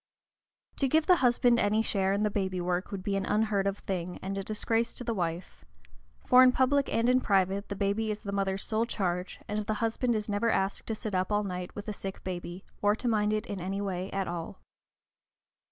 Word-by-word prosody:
To 275 Hz, -, +2 dB
give 310 Hz, +4 st, +3 dB
the 365 Hz, -2 st, +6 dB
husband 245 Hz, -2 st, +4 dB
any 215 Hz, +1 st, +2 dB
share 195 Hz, -3 st, 0 dB
in 200 Hz, +2 st, +1 dB
the 210 Hz, -, +1 dB
baby 190 Hz, -2 st, -1 dB
work 180 Hz, +1 st, -1 dB
would 195 Hz, -2 st, -5 dB
be 200 Hz, 0 st, -1 dB
an 195 Hz, -, -1 dB
unheard 210 Hz, -2 st, +1 dB
of 195 Hz, 0 st, -1 dB
thing, 180 Hz, -3 st, -4 dB
and 195 Hz, +1 st, -3 dB
a 195 Hz, -, -3 dB
disgrace 225 Hz, +3 st, 0 dB
to -, -, -5 dB
the 235 Hz, -1 st, -1 dB
wife; 175 Hz, -2 st, -4 dB, 0.6 s
for 250 Hz, -, +7 dB
in 255 Hz, 0 st, +8 dB
public 270 Hz, +2 st, +2 dB
and 230 Hz, +1 st, +2 dB
in 255 Hz, +1 st, +4 dB
private 195 Hz, -1 st, +1 dB
the 200 Hz, -, -3 dB
baby 200 Hz, +2 st, 0 dB
is 210 Hz, 0 st, -4 dB
the 200 Hz, -, -4 dB
mother's 195 Hz, -1 st, 0 dB
sole 225 Hz, +1 st, 0 dB
charge, 180 Hz, -4 st, -2 dB
and 210 Hz, +1 st, -2 dB
the 215 Hz, -, 0 dB
husband 230 Hz, +2 st, 0 dB
is 210 Hz, -1 st, -2 dB
never 210 Hz, +2 st, +1 dB
asked 195 Hz, -2 st, 0 dB
to 225 Hz, -, -1 dB
sit 215 Hz, -1 st, -5 dB
up 185 Hz, +2 st, 0 dB
all 210 Hz, 0 st, +2 dB
night 180 Hz, -2 st, -5 dB
with 205 Hz, +1 st, -7 dB
a 210 Hz, -, -2 dB
sick 195 Hz, -1 st, -7 dB
baby, 180 Hz, 0 st, -6 dB, 0.2 s
or 205 Hz, 0 st, +3 dB
to 245 Hz, -, -4 dB
mind 210 Hz, -2 st, +2 dB
it 215 Hz, 0 st, -1 dB
in 200 Hz, -3 st, -5 dB
any 195 Hz, +2 st, -3 dB
way 190 Hz, -2 st, -3 dB
at 195 Hz, -1 st, -2 dB
all. 170 Hz, +2 st, -5 dB
205 Hz, 225 wpm, -29 LUFS, 190-225 Hz, 0.6 s, in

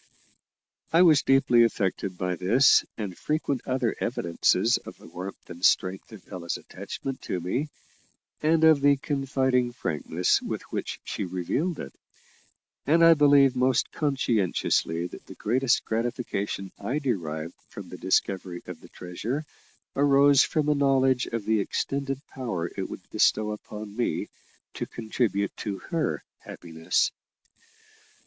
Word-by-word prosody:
I 170 Hz, +2 st, +6 dB
was 155 Hz, -5 st, +6 dB
deeply 135 Hz, -3 st, +4 dB
affected 100 Hz, -4 st, -1 dB
by 90 Hz, -1 st, -1 dB
this 115 Hz, +10 st, +5 dB
and 100 Hz, -5 st, -4 dB
frequent 150 Hz, -, -2 dB
other 130 Hz, -3 st, 0 dB
evidences 85 Hz, -1 st, +1 dB
of -, -, -11 dB
the -, -, -16 dB
warmth 90 Hz, +3 st, -8 dB
and 85 Hz, 0 st, -11 dB
strength 95 Hz, +2 st, +2 dB
of 105 Hz, -4 st, -13 dB
Ella's 85 Hz, -2 st, -4 dB
attachment 135 Hz, -1 st, -7 dB
to 90 Hz, -, -3 dB
me, 125 Hz, -, -2 dB, 0.7 s
and 160 Hz, +1 st, +3 dB
of 160 Hz, -3 st, +6 dB
the 140 Hz, 0 st, +5 dB
confiding 130 Hz, -3 st, 0 dB
frankness 85 Hz, -, 0 dB
with -, -, -4 dB
which -, -, -4 dB
she -, -, -4 dB
revealed 95 Hz, -, -2 dB
it; -, -, -7 dB, 0.9 s
and 165 Hz, +3 st, +5 dB
I 165 Hz, -, +9 dB
believe 140 Hz, -3 st, +5 dB
most 130 Hz, 0 st, +2 dB
conscientiously 110 Hz, -, 0 dB
that 90 Hz, -, -10 dB
the -, -, -10 dB
greatest 125 Hz, +3 st, +1 dB
gratification 110 Hz, -4 st, -3 dB
I 135 Hz, -, -2 dB
derived 85 Hz, -, -3 dB, 0.2 s
from -, -, -9 dB
the -, -, -8 dB
discovery 95 Hz, -2 st, -1 dB
of -, -, -9 dB
the -, -, -15 dB
treasure 110 Hz, -, -4 dB, 0.5 s
arose 140 Hz, 0 st, +5 dB
from 155 Hz, -2 st, 0 dB
a 150 Hz, -, +4 dB
knowledge 135 Hz, -2 st, +2 dB
of 115 Hz, -3 st, -4 dB
the 110 Hz, -1 st, +2 dB
extended 135 Hz, +6 st, -2 dB
power 100 Hz, -, -3 dB
it -, -, -4 dB
would -, -, -9 dB
bestow 105 Hz, 0 st, +2 dB
upon 105 Hz, 0 st, -8 dB
me 120 Hz, -, -1 dB, 0.4 s
to -, -, -4 dB
contribute 110 Hz, -3 st, -1 dB
to 100 Hz, -3 st, -4 dB
her 165 Hz, -2 st, -1 dB, 0.2 s
happiness. 80 Hz, -1 st, -1 dB
120 Hz, 140 wpm, -26 LUFS, 95-140 Hz, 0.9 s, I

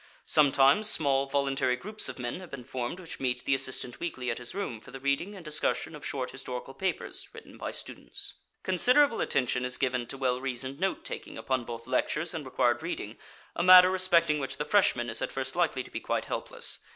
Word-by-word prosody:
Sometimes 145 Hz, +7 st, +5 dB
small 140 Hz, -6 st, +2 dB
voluntary 135 Hz, -2 st, +1 dB
groups 210 Hz, +5 st, 0 dB
of 130 Hz, -, -7 dB
men 120 Hz, +5 st, -4 dB
have 185 Hz, -2 st, -10 dB
been 135 Hz, -3 st, -8 dB
formed 130 Hz, +5 st, -4 dB
which 170 Hz, -3 st, -9 dB
meet 125 Hz, -2 st, -1 dB
the 140 Hz, -, +2 dB
assistant 130 Hz, -2 st, -2 dB
weekly 130 Hz, -8 st, -3 dB
at 115 Hz, -, -4 dB
his 120 Hz, +7 st, -6 dB
room 165 Hz, -, -3 dB
for 110 Hz, -, -15 dB
the 135 Hz, +1 st, -8 dB
reading 140 Hz, +9 st, -1 dB
and 180 Hz, -4 st, -11 dB
discussion 150 Hz, +1 st, 0 dB
of 150 Hz, -, -11 dB
short 130 Hz, -2 st, -3 dB
historical 130 Hz, 0 st, -6 dB
papers 185 Hz, +6 st, -3 dB
written -, -, -12 dB
by -, -, -5 dB
students. -, -, -7 dB, 0.3 s
Considerable 250 Hz, +7 st, +4 dB
attention 125 Hz, -1 st, +1 dB
is 125 Hz, 0 st, -1 dB
given 125 Hz, -2 st, -1 dB
to 135 Hz, -, -6 dB
well 130 Hz, -1 st, 0 dB
reasoned 135 Hz, +1 st, -4 dB
note 195 Hz, +1 st, -1 dB
taking -, -, -6 dB
upon 130 Hz, -3 st, -1 dB
both 115 Hz, 0 st, -7 dB
lectures 150 Hz, +5 st, 0 dB
and 155 Hz, -3 st, -5 dB
required 120 Hz, -2 st, +1 dB
reading, -, -, -5 dB, 0.4 s
a -, -, -1 dB
matter 185 Hz, +1 st, +9 dB
respecting 170 Hz, -5 st, +3 dB
which 135 Hz, -1 st, -4 dB
the 150 Hz, -, -2 dB
freshman 150 Hz, -10 st, +3 dB
is 115 Hz, -1 st, +1 dB
at -, -, -2 dB
first 130 Hz, 0 st, -3 dB
likely 165 Hz, -7 st, +1 dB
to -, -, -14 dB
be -, -, -3 dB
quite -, -, -2 dB
helpless. -, -, -2 dB
135 Hz, 205 wpm, -29 LUFS, 125-170 Hz, 0.4 s, matter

